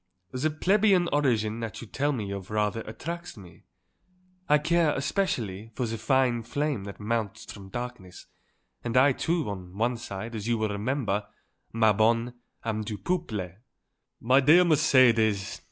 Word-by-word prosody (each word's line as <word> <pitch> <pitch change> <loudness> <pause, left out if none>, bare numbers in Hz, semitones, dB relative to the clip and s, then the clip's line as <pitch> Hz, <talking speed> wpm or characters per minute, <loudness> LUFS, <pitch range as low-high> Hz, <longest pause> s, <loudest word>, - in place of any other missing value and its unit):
The 130 +5 0
plebeian 190 +3 +3
origin 115 -6 +1
that 110 -2 -5
you - - -8
tell 140 +6 -1
me 105 -7 -3
of 100 -1 -6
rather 105 +1 0
attracts 170 +7 -6
me. 90 -4 -14 0.8
I 150 - +6
care, 165 0 +2
especially, 120 - -2
for 125 - -1
the 115 0 -3
fine 125 +1 +2
flame 140 -1 -2
that 100 - -9
mounts 110 -1 -3
from 100 -2 -11
darkness; 120 -6 -7 0.6
and 120 +1 -1
I, 135 +2 +6
too, 165 +4 -1
on 95 -2 -7
one 120 +2 0
side, 110 0 -7
as 110 -1 -5
you 120 -1 +1
will 110 -1 -1
remember, 105 -1 -1 0.5
ma 110 -1 +4
bonne, 115 +3 +2 0.3
am 110 -1 -1
du 105 0 -5
peuple." 110 - -3 0.6
"My 130 +4 +4
dear 160 +6 +6
Mercedes! 120 - +3
115 Hz, 155 wpm, -27 LUFS, 105-140 Hz, 0.8 s, I